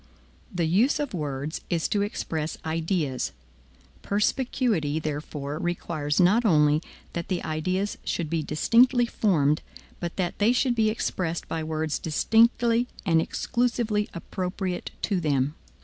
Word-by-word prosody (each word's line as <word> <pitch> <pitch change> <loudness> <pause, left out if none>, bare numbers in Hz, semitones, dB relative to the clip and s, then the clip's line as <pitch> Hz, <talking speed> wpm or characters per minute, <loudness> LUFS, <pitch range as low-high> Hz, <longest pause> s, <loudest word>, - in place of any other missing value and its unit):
The 175 -4 0
use 205 - +3
of 290 -5 -2
words 145 -2 -3
is 170 -2 +1
to 205 - +1
express 160 -6 -3
ideas. 160 -4 -1 0.7
Perspicuity, 210 - 0
therefore, 150 -1 -4
requires 170 -4 -1
not 195 +7 +5
only 150 -6 +4 0.3
that 170 -1 -4
the 185 -2 -2
ideas 185 +6 -1
should 170 - -2
be 165 +1 -1
distinctly 240 - +4
formed, 155 -10 +2 0.4
but 175 -1 -4
that 180 -2 -2
they 215 +4 +4
should 250 0 +2
be 220 -2 +2
expressed 180 -6 -2
by 160 -1 -3
words 155 -1 -2
distinctly 230 +7 +3 0.2
and 165 -3 +4
exclusively 235 -1 0
appropriate 180 +1 -4
to 195 -4 +1
them. 145 -3 +1
175 Hz, 130 wpm, -26 LUFS, 155-215 Hz, 0.7 s, not